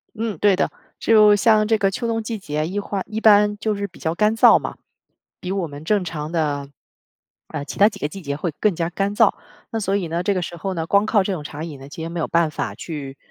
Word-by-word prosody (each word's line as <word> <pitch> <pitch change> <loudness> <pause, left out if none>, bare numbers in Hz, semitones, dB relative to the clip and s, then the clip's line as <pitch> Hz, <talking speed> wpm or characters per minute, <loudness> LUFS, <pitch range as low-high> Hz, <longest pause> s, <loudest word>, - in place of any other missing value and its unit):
嗯， 220 -4 -3
对 205 -2 +4
的。 - - 0 0.3
就 215 -2 +6
像 215 +1 +4
这 220 0 +3
个 200 -2 +2
秋 230 +5 -3
冬 225 -1 -1
季 225 +1 -4
节 155 -5 -3
一 195 +4 -2
欢 200 -1 -3
一 220 - -4
般 210 -1 +5
就 215 +1 -1
是 200 0 -3
比 180 - -18
较 160 - -1
干 210 +5 +2
燥 225 - +7
嘛， - - -6 0.6
比 180 - -5
我 195 -2 -1
们 145 0 -10
正 205 +1 +2
常 155 -3 -5
的， 145 -4 -1 0.8
呃， 150 -2 -5
其 - - -8
他 205 - +8
几 - - -11
个 145 - -1
季 195 +5 -9
节 140 -4 -3
会 160 +3 -3
更 210 -4 +2
加 165 0 -1
干 195 +3 -2
燥， - - +5 0.4
那 225 - -2
所 195 -2 0
以 195 -4 -1
呢， 165 +2 -2
这 200 +2 +1
个 185 - 0
时 170 - -7
候 190 +3 -3
呢， 165 -1 -2
光 200 +4 +3
靠 210 -4 +3
这 195 - -2
种 165 -5 -5
茶 145 +1 -7
饮 155 -4 -7
呢， 135 +1 -11
其 160 +3 -7
实 165 - -4
没 170 0 -5
有 165 - -1
办 170 -2 +2
法 - - -4
去， 140 -4 -7
190 Hz, 285 characters per minute, -21 LUFS, 160-210 Hz, 0.8 s, 他